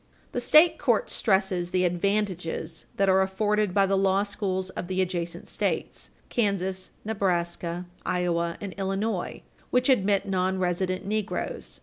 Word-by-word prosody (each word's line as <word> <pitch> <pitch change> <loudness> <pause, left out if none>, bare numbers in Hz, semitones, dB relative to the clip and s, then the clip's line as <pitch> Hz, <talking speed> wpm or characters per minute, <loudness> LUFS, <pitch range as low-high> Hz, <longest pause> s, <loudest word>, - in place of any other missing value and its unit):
The - - -1
state 315 +5 +6
court 240 -7 +1
stresses 190 -4 +1
the 185 0 +2
advantages 180 -3 -1
that 195 - +3
are 190 0 +5
afforded 205 +1 +1
by 195 +1 +4
the 195 0 +1
law 195 0 +3
schools 190 -2 -2
of 175 - -5
the 185 0 -2
adjacent 175 -2 -2
States - - -2 0.2
Kansas, 190 -4 0 0.2
Nebraska, 175 -4 -1 0.2
Iowa 170 -1 0
and 200 -2 -6
Illinois 195 0 -2 0.3
which 250 +2 +2
admit 200 -6 +3
nonresident 185 0 0
negroes. 215 +1 -3
190 Hz, 130 wpm, -27 LUFS, 180-205 Hz, 0.3 s, state